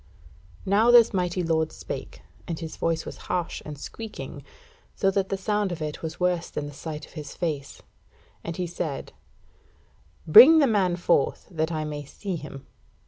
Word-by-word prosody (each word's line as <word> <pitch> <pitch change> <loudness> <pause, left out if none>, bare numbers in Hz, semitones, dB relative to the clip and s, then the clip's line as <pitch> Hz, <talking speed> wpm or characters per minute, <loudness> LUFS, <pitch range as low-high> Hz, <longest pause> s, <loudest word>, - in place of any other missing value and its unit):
Now 205 +5 +4
this 240 -2 +7
mighty 180 -1 0
lord 160 -1 +1
spake, - - -7 0.2
and 165 - -3
his 160 -2 -6
voice 165 -1 -1
was - - -7
harsh 175 -2 -2
and 150 -1 -8
squeaking, 220 +9 -8 0.5
so 195 - +2
that 195 0 0
the 195 - -1
sound 205 0 0
of 175 - -4
it 150 -1 -5
was 160 0 -6
worse 180 -1 0
than 150 - -4
the 145 - -8
sight 150 +1 -7
of - - -20
his 150 -2 -8
face; 150 -5 -4 0.6
and 170 -1 -5
he 180 - -1
said: 165 -4 -5 1.1
"Bring 245 - +10
the 300 - +6
man 195 -7 +2
forth, 170 -5 +1
that 160 -1 -1
I 155 -1 -2
may 150 -1 -5
see 185 +7 -5
him." 145 -4 -9
170 Hz, 175 wpm, -26 LUFS, 155-195 Hz, 1.1 s, Bring